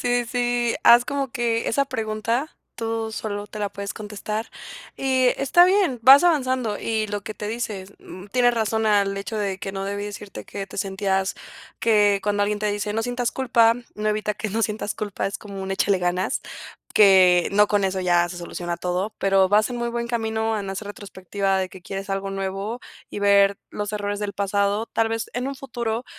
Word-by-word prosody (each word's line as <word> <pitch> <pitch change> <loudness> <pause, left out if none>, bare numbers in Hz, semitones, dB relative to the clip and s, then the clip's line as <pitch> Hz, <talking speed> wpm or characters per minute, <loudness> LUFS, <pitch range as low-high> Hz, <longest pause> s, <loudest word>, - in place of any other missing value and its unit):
sí, 245 0 +1
sí. 240 -1 0
Haz 240 +1 +7
como 280 -2 -2
que 230 -1 0
esa 280 +4 +2
pregunta, 230 +2 -2 0.2
tú 225 -1 -3
sólo 205 -2 -4
te 215 - -9
la 205 -1 -1
puedes 200 0 -6
contestar. 215 +1 -5 0.5
Y 260 -1 +2
está 315 +6 +5
bien, 370 -8 +2
vas 275 +7 +9
avanzando. 255 -9 +1
Y 220 -1 -1
lo 205 0 -3
que 215 +1 -6
te 210 - -5
dices, 210 -4 -4
mm, 185 +2 -11
tienes 245 +2 +3
razón, 220 -1 0
al 200 -2 +2
hecho 195 +2 -4
de 200 -3 -2
que 195 - -5
no 195 0 -4
debí 200 +1 -3
decirte, 205 -1 -8
que 195 -1 -6
te 195 - -9
sentías 195 -1 -1 0.4
que 205 -3 +3
cuando 205 0 +1
alguien 210 +1 0
te 210 0 0
dice: 205 0 -2
"No 225 +1 -1
sientas 245 0 -2
culpa", 235 -3 +3 0.2
no 210 0 -2
evita 210 0 -1
que 215 - -4
no 225 +3 -1
sientas 210 0 -2
culpa. 205 -2 -3
Es 195 - -3
como 200 -2 -8
un 190 - -5
échale 195 0 +2
ganas, 180 +1 -1 0.5
que 185 -4 +6
no 210 +1 +5
con 205 -1 +1
eso 190 0 -1
ya 175 -1 +3
se 175 - -7
soluciona 175 0 -5
todo. 180 +4 -2
Pero 195 -1 +3
vas 210 +1 +4
en 245 - -5
muy 235 0 -2
buen 235 0 -3
camino, 220 -1 -1
en 195 -1 -4
hacer 200 +2 -5
retrospectiva 195 -1 -2
de 190 -1 -1
que 185 -1 -13
quieres 195 +2 -6
algo 195 0 -2
nuevo, 195 +4 -4 0.3
y - - -5
ver 200 -1 +4
los 205 0 -4
errores 205 -1 -2
del 205 -1 -3
pasado. 200 +2 0
Tal 225 -1 0
vez, 225 0 -2
en 250 +1 -2
un 275 - -3
futuro, 240 -3 -4
210 Hz, 200 wpm, -23 LUFS, 195-230 Hz, 0.5 s, vas